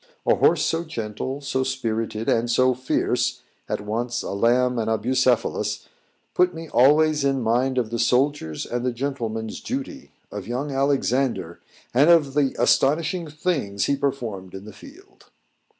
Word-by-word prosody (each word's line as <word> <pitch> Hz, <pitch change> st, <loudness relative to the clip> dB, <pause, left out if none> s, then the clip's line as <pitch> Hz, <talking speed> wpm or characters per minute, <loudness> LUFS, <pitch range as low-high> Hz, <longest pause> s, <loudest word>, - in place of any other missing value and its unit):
A -, -, +4 dB
horse 155 Hz, -2 st, +3 dB
so 165 Hz, +1 st, 0 dB
gentle, 130 Hz, -1 st, -5 dB
so 130 Hz, -1 st, -1 dB
spirited, 115 Hz, -4 st, -3 dB
and 115 Hz, +1 st, +1 dB
so 130 Hz, +2 st, +3 dB
fierce 130 Hz, +1 st, -1 dB, 0.3 s
at -, -, -2 dB
once 120 Hz, +3 st, -3 dB
a -, -, -5 dB
lamb 120 Hz, +4 st, +2 dB
and 110 Hz, -1 st, -1 dB
a 110 Hz, -, +2 dB
Bucephalus, 125 Hz, +2 st, 0 dB, 0.5 s
put 180 Hz, -1 st, +2 dB
me 165 Hz, 0 st, -7 dB
always 150 Hz, +3 st, +4 dB
in 135 Hz, -1 st, +1 dB
mind 125 Hz, +3 st, +1 dB
of 115 Hz, -3 st, 0 dB
the 115 Hz, -, -2 dB
soldier's 125 Hz, -, +1 dB
and 120 Hz, 0 st, -3 dB
the 125 Hz, -1 st, -1 dB
gentleman's 115 Hz, -4 st, -4 dB
duty! 275 Hz, +1 st, -6 dB, 0.2 s
of 105 Hz, -1 st, -7 dB
young 130 Hz, +5 st, -3 dB
Alexander, 135 Hz, -8 st, 0 dB, 0.3 s
and 140 Hz, +6 st, +5 dB
of 155 Hz, -5 st, +4 dB
the 140 Hz, -2 st, +1 dB
astonishing 155 Hz, +7 st, +2 dB
things 145 Hz, -, -2 dB
he 140 Hz, -, +1 dB
performed 120 Hz, -10 st, -4 dB
in 95 Hz, +1 st, -9 dB
the 110 Hz, -, -10 dB
field. 370 Hz, +8 st, -16 dB
130 Hz, 155 wpm, -23 LUFS, 115-145 Hz, 0.5 s, and